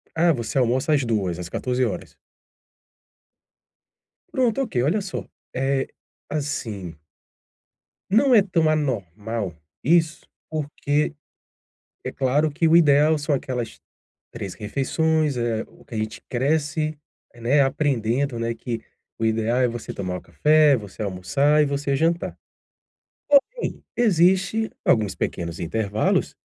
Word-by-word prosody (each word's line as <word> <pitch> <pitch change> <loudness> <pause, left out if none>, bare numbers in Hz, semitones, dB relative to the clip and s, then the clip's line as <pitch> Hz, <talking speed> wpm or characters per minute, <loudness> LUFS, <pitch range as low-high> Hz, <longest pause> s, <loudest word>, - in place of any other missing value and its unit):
Ah, 170 +1 +4
você 120 -1 -3
almoça 130 +4 +2
às 140 -3 +2
2, 95 -7 -1
às 90 - -5
14 125 0 0
horas? - - -5 2.1
Pronto, 255 -1 +1
ok, 220 - -5
olha 175 +10 +1
só, 195 -1 -5 0.3
eh, 135 +1 0 0.4
assim 110 - -4 1.1
não 250 +6 +4
é 210 - +8
tão 170 -5 +1
anormal 110 - -2 0.3
isso, 165 +1 +2 0.2
porque 150 -1 -1 0.9
é - - -3
claro 145 +4 +1
que 160 +3 +1
o 160 - +5
ideal 155 -1 +5
são 145 +1 -1
aquelas 125 -4 -4 0.5
3 100 -6 -6
refeições. 145 +5 0
É 115 -2 -1
o - - -20
que 125 - -9
a - - -2
gente 110 0 -4
cresce, 155 +3 0 0.4
né, 125 +5 +2
aprendendo, 135 -2 0
né, 115 0 -1
que 115 0 -5 0.4
o 115 - 0
ideal 110 +2 +1
é 125 - +4
você 120 -1 -5
tomar 90 -2 -3
o - - -10
café, 150 -1 +4
você 105 -3 -7
almoçar 105 +11 +2
e - - +2
você 140 0 -1
jantar. 165 +4 0 0.9
Porém, 465 - +2
existe 195 +1 +3 0.2
alguns 105 -5 +2
pequenos 85 -1 -3
intervalos 105 +4 0
135 Hz, 125 wpm, -23 LUFS, 115-155 Hz, 2.1 s, é